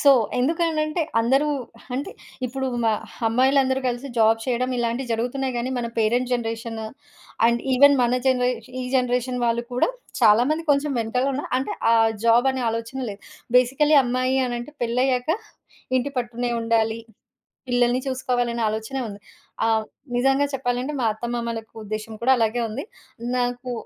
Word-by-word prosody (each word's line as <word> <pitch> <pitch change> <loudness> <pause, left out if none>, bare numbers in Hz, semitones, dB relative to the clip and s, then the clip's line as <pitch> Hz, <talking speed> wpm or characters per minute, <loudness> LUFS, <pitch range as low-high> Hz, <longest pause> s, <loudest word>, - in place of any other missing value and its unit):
So, 285 - +6 0.3
ఎందునంటే 315 +3 +1 0.2
అందరూ 270 +6 +2 0.4
అంటే 270 +9 -4 0.4
ఇప్పుడు 265 +2 -3 0.2
మా 220 - +3 0.3
అమ్మాయిలందరూ 260 +3 +3
కలిసి 245 +3 -4
జాబ్ 225 0 +4
చేయడం 255 0 0
ఇలాంటివి 240 +1 -2
జరుగుతున్నాయి, 250 +3 -2
గాని 250 +2 -2
మన 235 - -2
పేరెంట్ 240 +3 +1
జనరేషను 225 -1 -3 0.6
అండ్ 235 0 +2
ఈవెన్ 285 +2 +7
మన 245 +1 +2
జనరే 250 -1 +3 0.3
ఈ - - -4
జనరేషన్ 250 0 0
వాళ్ళు 235 0 +1
కూడా 250 - +2 0.3
చాలా 215 +3 +6
మంది 315 +2 0
కొంచెం 285 +1 +2
వెనకాలున్న 255 +5 0 0.2
అంటే 265 - -3 0.2
ఆ - - +6 0.3
జాబ్ 235 +3 +5
అనే 260 -1 -3
ఆలోచనలే. 230 -1 -4 0.4
బేసికల్లీ 270 +5 +4
అమ్మాయి 255 +2 0
అనంటే 240 +3 -4
పెళ్లయ్యాక 250 +2 +1 0.7
ఇంటిపట్టునే 245 -2 -2
ఉండాలి, 225 0 +1 0.7
పిల్లల్ని 245 +1 +2
చూసుకోవాలనే 245 -2 -1
ఆలోచనే 220 +5 -3
ఉంది. 200 -1 -8 0.5
ఆహ్, 220 -1 +2 0.3
నిజంగా 270 +3 +3
చెప్పాలంటే 255 +2 -1
మా 235 - +1
అత్తమామల 235 +1 -3
యొక్క 220 - -27
ఉద్దేశ్యం 215 +1 -5
కూడా 260 +2 +5
అలాగే 230 +1 +1
ఉంది. 255 +8 -4 0.5
నాకు 245 0 -2
245 Hz, 135 wpm, -23 LUFS, 230-265 Hz, 0.7 s, ఈవెన్